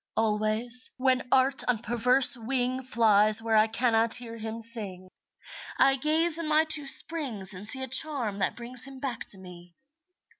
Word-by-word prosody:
Always, 220 +3 0
when 255 -1 -1
Art 265 +1 +2
on 250 -2 0
perverse 245 +4 +2
wing 250 +2 -3
Flies 215 -4 +3
where 225 0 -2
I 215 0 +3
cannot 225 0 +1
hear 235 -1 -7
him 220 0 -8
sing, 205 -6 -1 0.7
I 270 0 +3
gaze 315 +4 +1
in 330 - -5
my 310 +1 +2
two 300 -3 0
springs 255 - 0
and 190 +3 -7
see 265 +4 +2
A - - -6
charm 260 -6 +1
that 190 - -2
brings 245 +1 -1
him 270 -1 -10
back 255 -4 -6
to 195 - +4
me. 175 -2 -15
240 Hz, 165 wpm, -25 LUFS, 215-265 Hz, 0.7 s, to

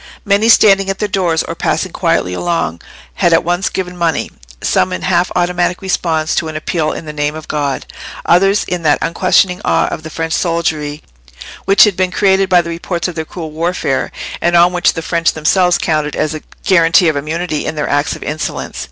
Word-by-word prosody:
Many 205 +2 +2
standing 195 -3 +5
at 195 - -2
their 210 - -1
doors 180 -5 0
or - - -5
passing - - -1
quietly 90 - 0
along 90 - -2 0.4
had 175 - +4
at 165 - +4
once 175 +3 0
given 180 -1 -4
money—some 160 - -2
in 185 - -4
half 180 -1 +1
automatic 175 0 0
response 165 -4 -1
to 160 - -1
an 155 - -6
appeal 155 0 -1
in - - -7
the 150 - -7
name 150 0 -2
of 155 0 -9
God, 145 -3 -2 0.4
others 195 +3 +3
in 180 -1 -3
that 150 -2 +3
unquestioning 180 +1 +1
awe - - +2
of - - -5
the 160 - -8
French 160 0 -3
soldiery 160 -4 -1 0.6
which 195 +1 +6
had 210 -4 +3
been 185 0 0
created 190 +1 +2
by 180 -1 +4
the 170 - -5
reports 170 +1 -3
of 180 - -5
their 160 -1 -4
cruel 160 -1 -7
warfare, 160 -4 -1 0.3
and 175 0 +2
on 175 +1 +5
which 180 - +2
the 165 - -5
French 170 0 +1
themselves 180 +3 +2
counted 155 -2 -1
as 155 0 -1
a 155 - -6 0.2
guarantee 170 -1 +4
of 155 - +1
immunity 155 +2 -3
in - - -3
their 150 - -2
acts 145 +1 0
of - - -9
insolence. 155 +1 -4
170 Hz, 200 wpm, -15 LUFS, 155-180 Hz, 0.6 s, which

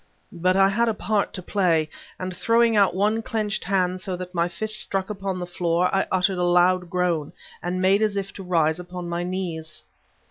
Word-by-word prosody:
But 185 +1 +1
I 195 0 +5
had 230 +3 +1
a 220 - -1
part 210 -1 0
to 185 - -5
play, 170 -6 +1 0.3
and 185 0 -5
throwing 230 +3 +3
out 200 -3 +4
one 210 +4 +1
clenched 220 -3 -2
hand 185 -1 0
so 185 -1 -3
that 180 0 -7
my 170 -1 +1
fist 215 +5 -1
struck 195 +1 -2
upon 195 -2 -3
the 180 - -4
floor, 175 0 0
I 195 - +1
uttered 185 0 +1
a - - +1
loud 180 0 +3
groan, 175 -4 -1 0.3
and 180 +1 -2
made 190 +3 +3
as 210 -2 +1
if 195 0 -4
to 195 - -8
rise 165 -2 +1
upon 180 0 -7
my 170 0 -2
knees. 170 -4 -4
185 Hz, 205 wpm, -24 LUFS, 175-200 Hz, 0.3 s, I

